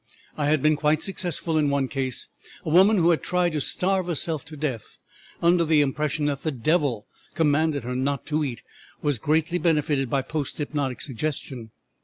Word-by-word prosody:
I 145 -2 -1
had 150 -2 +2
been 155 0 +4
quite 150 +1 +1
successful 175 -4 +1
in 145 -1 +2
one 140 -1 0
case 130 -3 -2 0.4
a 155 - -2
woman 195 +6 +6
who 175 -1 +4
had 165 - +1
tried 180 -1 +1
to 150 -2 -2
starve 185 +4 +2
herself 160 -3 -1
to 155 0 -10
death 135 -7 -4 0.5
under 170 0 +4
the 155 -2 +3
impression 145 +1 -1
that 140 -2 -1
the 155 - -1
devil 135 -3 0 0.3
commanded 155 -3 +1
her 125 +1 -4
not 135 +1 -1
to 155 0 -1
eat 125 -6 -5 0.4
was 145 -5 +1
greatly 160 - +1
benefited 150 -6 +1
by 135 0 0
post 150 0 -4
hypnotic 145 -4 -3
suggestion. 130 -3 -3
150 Hz, 180 wpm, -24 LUFS, 140-160 Hz, 0.5 s, woman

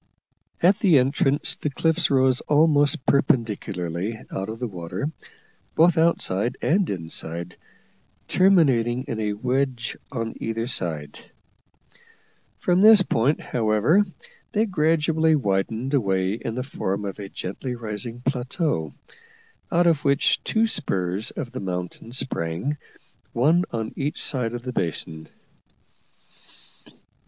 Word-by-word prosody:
At 190 +4 +5
the 175 -7 +5
entrance 135 +2 +1
the 150 - -2
cliffs 160 +4 +1
rose 130 -2 +3
almost 145 -1 +3
perpendicularly 105 - 0
out 95 +2 -4
of 110 - -5
the 125 - -3
water, 95 - -4 0.6
both 165 +1 +5
outside 125 - +1
and 185 +3 +1
inside, 85 -1 -3 0.7
terminating 130 -11 +3
in 115 - -5
a 105 -1 -1
wedge 125 +2 -1 0.2
on 115 -4 -3
either 115 0 -2
side. 80 - -3 1.4
From 180 +1 +2
this 215 -2 +8
point, 135 0 +1
however, 115 - +2 0.5
they 215 +2 +2
gradually 160 -3 +2
widened 110 +2 -1
away 95 -7 +1
in 115 0 -4
the 125 - -2
form 100 -7 -3
of 100 +1 -5
a 100 -1 -7
gently 125 +9 -5
rising 115 +1 -4
plateau, 130 - -2 0.8
out 175 +1 +3
of 165 -3 +3
which 140 0 +2
two 225 +1 +2
spurs 95 - -2
of 130 -7 -6
the - - -5
mountain 90 +3 -5
sprang, 120 - -3 0.6
one 160 +9 +3
on 110 -1 -4
each 145 +1 -2
side 120 -4 -1
of 120 - -6
the 125 0 -5
basin. 80 -4 -2
125 Hz, 120 wpm, -24 LUFS, 100-150 Hz, 1.4 s, this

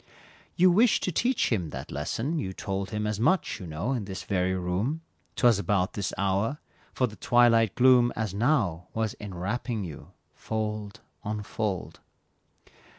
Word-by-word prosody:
You 185 0 +5
wished 220 +5 +4
to 185 - 0
teach 240 - +1
him 90 -8 0
that - - -7
lesson, 120 - -2
you 95 -9 -3
told 95 0 -3
Him 105 0 -2
as 105 -1 -2
much, 185 +11 +1
you 90 - -7
know, 85 +10 -3
in 120 -6 -1
this 95 -2 -6
very 95 -1 0
room, 95 - -1 0.3
'Twas 120 -5 +4
about 100 -2 0
this 100 - -2
hour, 100 +7 0 0.3
for 130 - +1
the 110 -4 -8
twilight 115 -4 +4
gloom 125 -1 +5
As 110 -3 -2
now, 100 - +1
was 110 -1 0
enwrapping 105 +4 -3
you, 80 -5 -8 0.2
fold 105 -2 -4 0.2
on 105 0 -3
fold. 100 -3 -3
105 Hz, 155 wpm, -27 LUFS, 95-120 Hz, 0.3 s, You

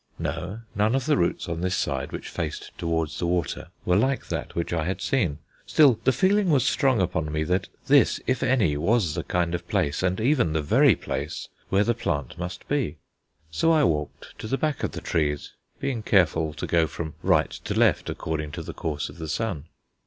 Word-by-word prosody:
No, 95 +6 -4
none 105 +4 +2
of 135 -2 0
the 150 - +3
roots 85 - 0
on 85 -1 -3
this 90 +1 0
side - - -2
which - - -6
faced 80 -4 -5
towards 80 -2 -2
the 85 - 0
water 90 0 -1 0.2
were 90 - +3
like 130 +7 +1
that - - -4
which 85 0 -2
I 80 -2 0
had 95 +1 -2
seen 95 - 0 0.3
still, 140 -7 +5
the 130 - +6
feeling 190 - +2
was 140 -5 +3
strong 130 -5 +2
upon 85 -4 -1
me 75 +1 0
that 90 +4 0 0.2
this, - - +4
if 130 -1 0
any, 110 - +2
was 100 -1 +2
the - - -2
kind 85 -1 0
of 85 0 -4
place, 90 -8 0
and 95 +1 0
even 120 - +2
the 80 - +1
very 70 - +5
place, - - -5 0.2
where 100 +1 +3
the 120 - +2
plant 75 - -3
must 90 0 -6
be. 140 - -1 0.5
So 165 - +2
I 155 -2 +4
walked 75 - -2
to - - -5
the 135 - 0
back 155 -1 -1
of - - -1
the - - -5
trees, 75 -3 -1 0.3
being 135 -5 -2
careful 80 -6 +2
to - - -4
go 85 -1 +2
from 80 -1 -6
right - - +3
to - - -5
left, - - +3
according 75 -2 -3
to - - -5
the - - -7
course 75 -3 -3
of 85 - -12
the 80 -1 -5
sun. 100 -10 -2
90 Hz, 210 wpm, -25 LUFS, 80-120 Hz, 0.5 s, the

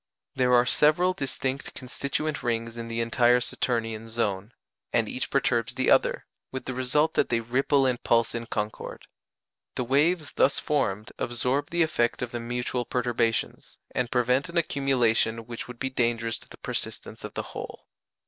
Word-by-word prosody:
There 125 -1 +3
are 120 0 +5
several 155 +7 +3
distinct 135 -3 -3
constituent 140 +3 -3
rings 115 -1 -1
in 115 -1 -6
the 115 0 -2
entire 120 +2 +4
Saturnian 115 -2 -1
zone, 110 -2 -2 0.4
and - - +2
each - - -3
perturbs - - +1
the - - +2
other, - - +3 0.3
with 130 - -5
the 130 - -3
result 130 +5 +1
that - - +2
they 115 - +2
ripple 135 +4 +2
and 125 -2 0
pulse 115 -1 +2
in 115 0 -4
concord. 105 -1 -4 0.7
The 125 - -1
waves 145 +5 +2
thus 140 - +3
formed 110 -8 -1
absorb 125 +4 0
the 170 0 +3
effect 120 -7 0
of 120 - -4
the 120 - -3
mutual 120 +1 -2
perturbations, 120 -2 -1 0.2
and 125 -1 0
prevent 125 +5 +2
an 170 - -4
accumulation 120 -7 +2
which 120 0 -6
would 125 -1 -9
be 130 +2 -2
dangerous 115 -2 0
to - - -18
the - - -12
persistence - - -4
of - - -7
the - - -2
whole. - - -7
125 Hz, 165 wpm, -27 LUFS, 115-135 Hz, 0.7 s, are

